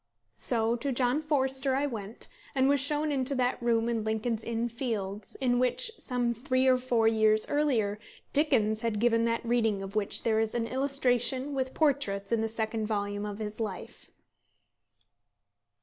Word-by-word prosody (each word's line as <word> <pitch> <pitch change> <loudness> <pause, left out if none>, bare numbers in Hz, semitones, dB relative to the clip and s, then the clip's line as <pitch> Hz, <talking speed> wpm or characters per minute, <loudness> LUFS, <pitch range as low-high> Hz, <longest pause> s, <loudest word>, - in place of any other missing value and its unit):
So 230 -1 0
to 275 +4 -2
John 250 +3 +1
Forster 270 -3 +1
I 280 +2 +1
went, 220 -5 -5 0.3
and 265 0 +3
was 285 0 +3
shown 295 +2 0
into 275 0 0
that 250 -1 0
room 230 -1 +2
in 230 -2 -1
Lincoln's 220 +1 -1
Inn 230 +1 -1
Fields 215 -5 -4
in 245 -2 +1
which, 255 - 0
some 245 -2 -1
three 255 +2 0
or 260 -1 +5
four 245 -3 +1
years 220 -1 +3
earlier, 235 -9 +1 0.3
Dickens 225 -8 +2
had 230 -2 -1
given 230 0 +3
that 230 0 -1
reading 225 -4 +1
of 195 +2 -8
which 210 -2 -1
there 220 -1 +2
is 220 0 -1
an 235 -1 0
illustration 260 +1 +1
with 260 -1 -2
portraits 260 -10 0
in 230 -1 +2
the 225 - 0
second 220 -1 -2
volume 205 -1 -2
of 205 -1 -5
his 215 0 -5
life. 210 -5 -6
235 Hz, 165 wpm, -29 LUFS, 220-260 Hz, 0.3 s, or